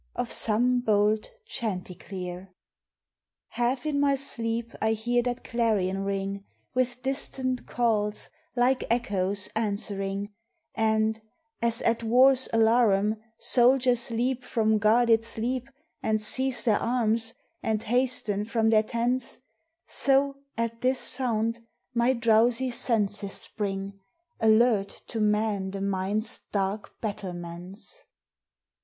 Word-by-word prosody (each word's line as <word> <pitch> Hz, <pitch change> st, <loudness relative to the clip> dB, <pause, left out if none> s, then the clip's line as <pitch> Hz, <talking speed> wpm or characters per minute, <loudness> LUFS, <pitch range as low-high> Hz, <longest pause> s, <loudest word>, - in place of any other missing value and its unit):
of 245 Hz, -1 st, -2 dB
some 245 Hz, +3 st, +2 dB
bold 215 Hz, -2 st, +1 dB, 0.2 s
chanticleer. 185 Hz, -, -5 dB, 1.0 s
(Half 245 Hz, +3 st, -1 dB
in 295 Hz, -2 st, 0 dB
my 280 Hz, -1 st, +3 dB
sleep 235 Hz, -3 st, -3 dB
I 220 Hz, 0 st, +2 dB
hear 240 Hz, +2 st, +1 dB
that 245 Hz, 0 st, -3 dB
clarion 205 Hz, -5 st, 0 dB
ring, 195 Hz, 0 st, -3 dB, 0.3 s
With 255 Hz, -1 st, -1 dB
distant 260 Hz, -1 st, -1 dB
calls, 215 Hz, -3 st, -1 dB, 0.2 s
like 255 Hz, +1 st, +2 dB
echoes, 200 Hz, -4 st, 0 dB
answering; 200 Hz, -1 st, -2 dB, 0.4 s
And, 220 Hz, 0 st, +1 dB, 0.4 s
as 230 Hz, -1 st, +2 dB
at 230 Hz, 0 st, +2 dB
war's 255 Hz, +3 st, +5 dB
alarum, 220 Hz, -2 st, +3 dB, 0.2 s
soldiers 250 Hz, -1 st, +3 dB
leap 245 Hz, +2 st, -1 dB
From 220 Hz, -3 st, +1 dB
guarded 225 Hz, +1 st, +4 dB
sleep 245 Hz, +3 st, -3 dB, 0.3 s
And 220 Hz, 0 st, +1 dB
seize 260 Hz, +4 st, +1 dB
their 220 Hz, -4 st, +3 dB
arms, 230 Hz, -1 st, 0 dB, 0.3 s
and 220 Hz, -1 st, -1 dB
hasten 235 Hz, -4 st, +1 dB
from 225 Hz, 0 st, +1 dB
their 215 Hz, -1 st, +5 dB
tents, 235 Hz, +3 st, -1 dB, 0.5 s
So, 275 Hz, 0 st, +2 dB, 0.2 s
at 230 Hz, 0 st, -2 dB
this 255 Hz, +1 st, +2 dB
sound, 230 Hz, -3 st, +1 dB, 0.3 s
my 240 Hz, +2 st, +3 dB
drowsy 235 Hz, +2 st, +3 dB
senses 210 Hz, -4 st, 0 dB
spring, 195 Hz, -1 st, -3 dB, 0.4 s
Alert 220 Hz, -2 st, +3 dB
to 225 Hz, -, -3 dB
man 210 Hz, -2 st, +1 dB
the 195 Hz, 0 st, -5 dB
mind's 200 Hz, +4 st, -1 dB
dark 200 Hz, +1 st, -3 dB
battlements.) 185 Hz, -, -5 dB
225 Hz, 110 wpm, -27 LUFS, 205-245 Hz, 1.0 s, war's